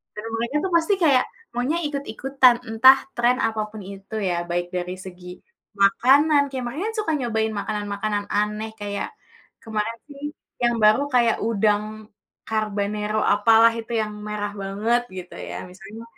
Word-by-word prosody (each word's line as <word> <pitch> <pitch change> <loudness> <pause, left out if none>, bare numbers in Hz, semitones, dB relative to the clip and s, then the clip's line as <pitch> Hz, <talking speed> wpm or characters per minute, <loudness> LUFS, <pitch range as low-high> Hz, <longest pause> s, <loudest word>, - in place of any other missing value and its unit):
Dan 210 - -6
mulanya 235 +5 -1
tuh 380 - -2
pasti 335 +5 +1
kayak, 275 -5 +4 0.3
maunya 255 +7 0
ikuti-ikutan, 270 -2 +2
entah 260 +4 +7 0.2
tren 240 +1 +3
apapun 215 -1 -4
itu 195 +3 -9
ya 175 - 0
baik 175 0 -1
dari 180 0 -3
segi 180 -1 -10 0.5
makanan, 280 +9 +5
kayak 260 -2 -4
mereka 255 +7 -4
kan - - -11
suka 325 - -1
nyobain 220 -3 -1
makanan-makanan 205 0 -2
aneh 210 +1 -1
kayak 205 0 -3 0.6
kemarin 220 +1 -3
sih 280 0 -12 0.4
yang 240 0 +3
baru 215 +5 +6
kayak 235 -2 +4
udang 210 -1 +2 0.6
carbanero 210 -1 -1 0.2
apalah 225 +2 +6
itu 225 - -8
yang 215 -1 -3 0.2
merah 205 -1 -3
banget 210 +5 0 0.2
gitu 180 -1 -8
ya - - -6
misalnya, 195 +5 -11
220 Hz, 145 wpm, -23 LUFS, 205-245 Hz, 0.6 s, entah